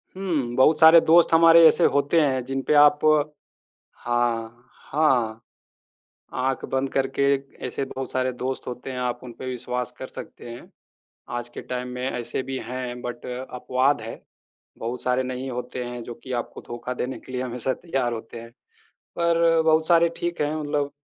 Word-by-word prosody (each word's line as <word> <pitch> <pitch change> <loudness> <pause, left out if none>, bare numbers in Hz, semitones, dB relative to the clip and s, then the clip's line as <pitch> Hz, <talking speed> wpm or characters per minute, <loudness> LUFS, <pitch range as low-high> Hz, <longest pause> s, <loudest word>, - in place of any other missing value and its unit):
हुँ, 155 -11 -2
बहुत 150 +5 +4
सारे 160 +1 +9
दोस्त 165 +1 +5
हमारे 165 0 +8
ऐसे 170 - +3
होते 145 +4 +3
हैं 130 -3 +1
जिन 135 +1 -2
पे - - +3
आप 145 0 +5 1.1
हाँ, 120 0 -2 0.2
हाँ। 125 -7 +2 1.0
आँख 135 0 -1
बंद 135 +1 0
करके 135 0 0 0.4
ऐसे 130 +2 -3
बहुत 130 0 -6
सारे 130 0 0
दोस्त 130 +1 -4
होते 125 +2 -6
हैं, 125 - -5
आप 125 -1 -2
उन 125 - -8
पे 130 - -7
विश्वास 125 0 -4
कर 130 - -7
सकते - - -10
हैं। 120 - -11 0.7
आज 120 0 -7
के - - -8
टाइम 125 0 -4
में 125 +1 -2
ऐसे 125 +1 -3
भी 135 0 -4
हैं 125 0 -5
बट 120 -1 -6
अपवाद 130 +2 -1
है। 115 - -8 0.6
बहुत 120 +2 -4
सारे 125 0 +1
नहीं 130 +1 -5
होते 125 0 -5
हैं 120 0 -6
जो 120 - -7
कि 130 - -6
आपको - - -12
धोखा 120 +1 -5
देने 125 +1 -4
के 130 - -12
लिए 125 0 -2
हमेशा 125 0 0
तैयार 130 -7 -1
होते 115 0 -7
हैं। 115 - -11 0.7
पर 170 -1 +3
बहुत 160 0 +3
सारे 170 -1 +5
ठीक 175 -1 -3
हैं 150 +1 0
मतलब 145 -2 -2
130 Hz, 175 wpm, -24 LUFS, 125-145 Hz, 1.1 s, सारे